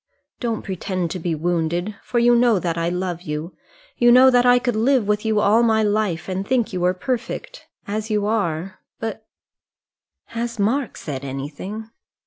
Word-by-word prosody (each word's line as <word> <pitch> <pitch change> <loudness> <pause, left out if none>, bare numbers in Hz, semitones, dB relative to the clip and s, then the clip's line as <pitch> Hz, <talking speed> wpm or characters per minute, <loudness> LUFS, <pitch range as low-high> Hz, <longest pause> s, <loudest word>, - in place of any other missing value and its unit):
"Don't 230 -3 -2
pretend 185 -2 -3
to 185 - -4
be 165 -1 -1
wounded, 175 +4 -1
for 245 - -3
you 240 0 +5
know 235 -3 +4
that 170 -2 -1
I 170 0 0
love 180 -1 -3
you. 155 0 -5 0.4
You 240 0 +6
know 260 +2 +8
that 245 0 +4
I 245 0 +7
could 245 -2 -1
live 235 0 +2
with 210 0 +1
you 220 -1 +2
all 210 +3 +4
my 220 -2 +3
life, 205 -6 0
and 190 0 -2
think 240 -1 0
you 180 - -2
were 180 +1 +2
perfect 270 - -4 0.2
as 215 +2 -3
you 210 -1 0
are; 190 -4 -1 0.2
but 220 -1 -5 0.5
" - - -68
"Has 235 0 -3
Mark 230 +5 0
said 140 -3 -6
anything?" 150 +11 -6
210 Hz, 180 wpm, -22 LUFS, 175-235 Hz, 0.5 s, know